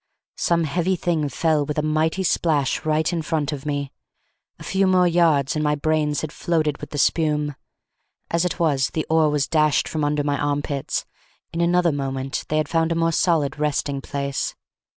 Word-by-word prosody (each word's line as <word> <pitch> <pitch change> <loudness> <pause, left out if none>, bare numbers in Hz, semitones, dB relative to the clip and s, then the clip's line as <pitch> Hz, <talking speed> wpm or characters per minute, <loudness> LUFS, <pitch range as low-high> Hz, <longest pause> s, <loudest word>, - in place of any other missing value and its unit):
Some 170 -1 +2
heavy 175 +5 0
thing 165 -4 -1
fell 155 +2 +1
with 150 +1 -4
a 150 - +1
mighty 155 +4 0
splash 155 -5 +1
right 155 +2 +1
in 170 - -1
front 155 -2 -1
of 145 0 -6
me. 145 -2 -2 0.7
A - - -11
few 195 0 +1
more 185 -1 +4
yards, 165 -5 +3
and 155 - 0
my 150 0 +2
brains 150 0 0
had 155 - -4
floated 155 -4 -1
with - - -8
the 145 - -6
spume. 150 -1 +1 0.8
As 170 +1 +2
it 180 0 -2
was, 145 -6 +2
the 155 - -1
oar 160 -1 +4
was 150 -2 0
dashed 155 -2 +2
from 155 -2 -2
under 145 0 +1
my 145 -1 -1
armpits; 145 -1 -2 0.5
in 165 - -1
another 175 0 +3
moment 135 -1 -3
they 155 - 0
had 155 -1 +1
found 165 +1 +1
a - - +1
more 165 0 +2
solid 155 -4 +1
resting 145 -2 -1
place. 140 0 -3
155 Hz, 190 wpm, -22 LUFS, 145-165 Hz, 0.8 s, more